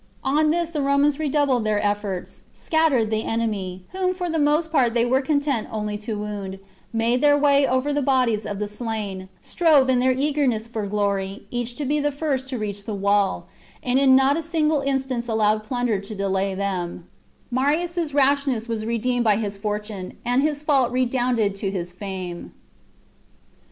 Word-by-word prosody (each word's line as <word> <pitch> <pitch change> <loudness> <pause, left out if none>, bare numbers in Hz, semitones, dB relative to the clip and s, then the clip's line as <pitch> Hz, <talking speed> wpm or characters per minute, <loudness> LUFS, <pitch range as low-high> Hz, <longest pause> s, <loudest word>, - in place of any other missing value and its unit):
On 300 +3 +2
this 340 +1 0
the 300 -3 -2
Romans 280 +1 +2
redoubled 285 -5 +1
their 215 -1 +1
efforts, 205 -3 -3
scattered 290 -9 +1
the 220 0 +1
enemy, 200 -5 -3
whom 370 0 -1
for 355 -2 -3
the 325 - 0
most 305 +2 +2
part 245 -7 +2
they 235 0 +3
were 260 +2 +2
content 285 -4 0
only 210 -1 -3
to 215 0 -4
wound, 205 -2 -5 0.3
made 235 +2 +1
their 290 -1 +5
way 280 -1 +4
over 260 +3 0
the 290 - +1
bodies 250 -6 +1
of 205 -1 -4
the 210 +1 -2
slain, 205 -3 -5
strove, 305 -6 +3
in 250 - +3
their 260 +1 +3
eagerness 265 -4 0
for 225 -3 -4
glory, 200 -1 -2
each 240 0 -3
to 290 - -3
be 295 +3 +1
the 290 0 0
first 275 -3 -2
to 260 - -3
reach 205 -2 -4
the 220 -3 -3
wall, 200 0 +1 0.4
and 250 +1 +2
in 270 -1 +6
not 270 +2 +4
a - - -1
single 315 -2 +1
instance 265 -3 -1
allowed 215 -1 +1
plunder 245 -2 -1
to 200 +2 -7
delay 195 0 -1
them, 180 -3 -3 0.4
Marius' 315 +5 0
rashness 275 -4 +2
was 225 -2 -3
redeemed 240 +1 0
by 215 -3 +4
his 205 -1 -2
fortune, 210 -2 -5
and 245 +2 +2
his 295 0 -1
fault 275 -5 +2
redounded 245 -4 +1
to 195 0 -3
his 180 -2 -4
fame. 185 -2 -6
245 Hz, 175 wpm, -23 LUFS, 210-280 Hz, 0.4 s, in